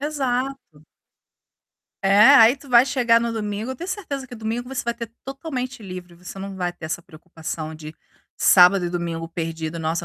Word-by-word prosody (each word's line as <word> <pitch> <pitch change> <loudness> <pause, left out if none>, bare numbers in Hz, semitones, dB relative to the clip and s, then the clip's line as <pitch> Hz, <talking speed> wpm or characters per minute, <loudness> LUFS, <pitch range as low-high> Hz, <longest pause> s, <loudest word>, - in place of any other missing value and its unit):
Exato. 270 - -3 1.2
É, 195 +1 +4 0.2
aí 235 -1 +7
tu 280 0 -16
vai 245 0 +6
chegar 245 -4 +3
no 235 0 -2
domingo, 215 +2 -3
eu - - -6
tenho 345 +8 -7
certeza 285 -9 -5
que 245 - -10
domingo 230 +2 -4
você 270 - -3
vai 235 - -1
ter 230 -1 -8
totalmente 270 -3 -5
livre, 180 -3 -9
você 180 +3 -11
não 195 0 -6
vai 180 -2 -2
ter 175 -2 -10
essa 160 +2 -4
preocupação 160 -1 -7
de 155 0 -10 0.4
sábado 180 0 +6
e - - -2
domingo 170 -2 -4
perdido, 165 -1 -5
"Nossa, 165 +1 -2
210 Hz, 180 wpm, -22 LUFS, 170-255 Hz, 1.2 s, aí